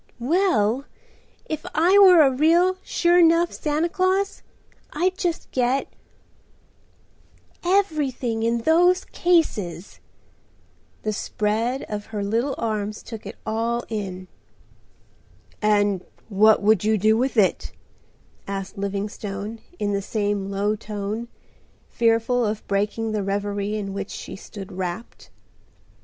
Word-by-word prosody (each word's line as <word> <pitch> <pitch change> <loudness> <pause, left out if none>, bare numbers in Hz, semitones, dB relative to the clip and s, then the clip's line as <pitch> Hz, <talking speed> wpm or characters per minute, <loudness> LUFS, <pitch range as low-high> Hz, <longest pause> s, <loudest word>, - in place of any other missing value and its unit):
"Well, 260 - +1 0.6
if 310 -1 -4
I 360 +6 +5
were 365 -5 +8
a 270 - +4
real, 340 +7 +3
sure 350 0 +3
'nough 335 +1 +4
Santa 305 +2 0
Claus, 375 +3 0 0.5
I'd 365 +4 0
just 350 -4 -3
get—everything 270 - -4
in 230 +1 +1
those 355 +5 +4
cases." 210 - 0 1.0
The 215 - -1
spread 220 +5 -1
of 210 -1 -6
her 210 -2 -4
little 230 +7 0
arms 215 -2 -3
took 220 -3 -8
it 205 - -8
all 230 +2 -1
in. 190 -4 -5 1.3
"And 205 -3 +2 0.3
what 215 +1 +4
would 210 -2 +4
you 215 +1 +2
do 215 +2 +3
with 255 +2 0
it?" 200 -3 +2 0.8
asked 195 0 -5
Livingstone 200 +2 -4 0.2
in 205 -1 -1
the 200 - 0
same 205 -1 -2
low 200 +2 0
tone, 210 +2 -5 0.6
fearful 230 +1 +2
of 210 -1 -2
breaking 210 +3 -1
the 215 -1 -1
reverie 200 +1 -2
in 200 -2 -4
which 195 0 -5
she - - -7
stood 195 0 -10
wrapped. 185 +4 -6
220 Hz, 115 wpm, -23 LUFS, 205-300 Hz, 1.3 s, were